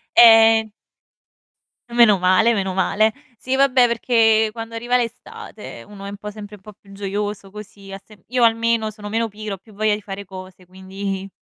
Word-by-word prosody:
Ehm 225 -1 +6 1.2
Meno 235 -4 +5
male, 185 +6 +3
meno 190 -2 -2
male. 215 +3 +1 0.2
Sì 260 +3 -3
vabbè 265 -2 +4
perché 225 -2 +2
quando 225 0 -8
arriva 240 +2 0
l'estate 235 -1 -7
uno 200 -1 -11
è - - -6
un 200 - -8
po' 210 +1 -8
sempre 210 0 -10
un 195 - -20
po' 210 +2 -13
più 195 0 -21
gioioso 200 0 -5
così, 200 -1 -12
ha 195 0 -8
semp 210 -5 -20
io 250 0 +1
almeno 230 -1 +1
sono 210 -1 -10
meno 225 +2 -1
pigra, 215 0 -7
ho - - -6
più 220 - -20
voglia 215 +1 0
di 210 - -4
fare 200 0 -8
cose 185 -1 -12
quindi 190 +1 -7
210 Hz, 185 wpm, -20 LUFS, 195-225 Hz, 1.2 s, Ehm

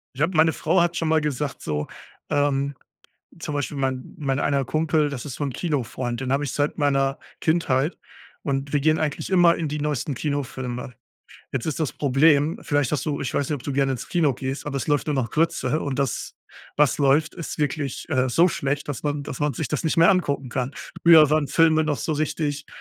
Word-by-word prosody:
Ich 140 - -2
habe 165 +1 +1
meine 160 0 +5
Frau 170 +3 +1
hat 170 0 +1
schon 165 - 0
mal 160 0 +3
gesagt 150 -1 -3
so, 75 -1 -2 0.4
ähm, 140 -1 +1 0.7
zum 150 - -5
Beispiel 145 0 -3
mein 130 -1 -2
mein 135 -3 -1
einer 140 -2 +1
Kumpel, 155 +1 +1
das 140 -4 -6
ist 135 -3 -6
so - - -3
'n 140 -3 -3
Kino-Freund, 130 -6 -2
den 130 0 -2
hab 140 - +1
ich 140 -4 -2
seit 145 +2 -1
meiner 135 -2 +1 0.2
Kindheit, 155 -2 +1 0.5
und 140 0 -2
wir 145 - +3
gehen 155 +2 +2
eigentlich 150 +3 -2
immer 175 -2 +5
in 160 - -2
die 150 +1 -3
neuesten 145 -2 -2
Kinofilme. 130 -4 -4 0.6
Jetzt 130 - -2
ist 160 0 -2
das 155 - -1
Problem 145 +2 +3
vielleicht 145 -2 0
hast 150 +1 -1
du 145 -2 -1
ich 130 - -3
weiß 140 - 0
nicht, 150 - 0
ob 130 - -7
du 140 - -3
gerne 135 0 +1
ins 125 - -6
Kino 155 -7 +2
gehst, 135 +4 -5
aber 140 -2 -3
es 130 - -3
läuft 145 0 +1
nur 150 - 0
noch 130 -4 -1
Grütze. 155 -3 0
Und 140 -2 -3
das, 140 -3 -2 0.4
was 145 -5 +3
läuft, 145 +2 +3
ist 170 - -6
wirklich, 145 -2 -2
äh, 130 -3 +2
so 165 +9 +4
schlecht, 145 -3 -2
dass 145 - -4
man 145 -1 -1
dass 135 - -6
man 150 -3 0
sich - - -3
das 150 - -2
nicht 160 - +1
mehr 165 +2 +7
angucken 140 -8 0
kann. 130 +2 -2 0.3
Früher 160 -3 +8
waren 155 -1 +2
Filme 160 -1 +4
noch 150 -2 0
so 155 - -2
richtig, 150 -1 -2
145 Hz, 220 wpm, -24 LUFS, 135-155 Hz, 0.7 s, Früher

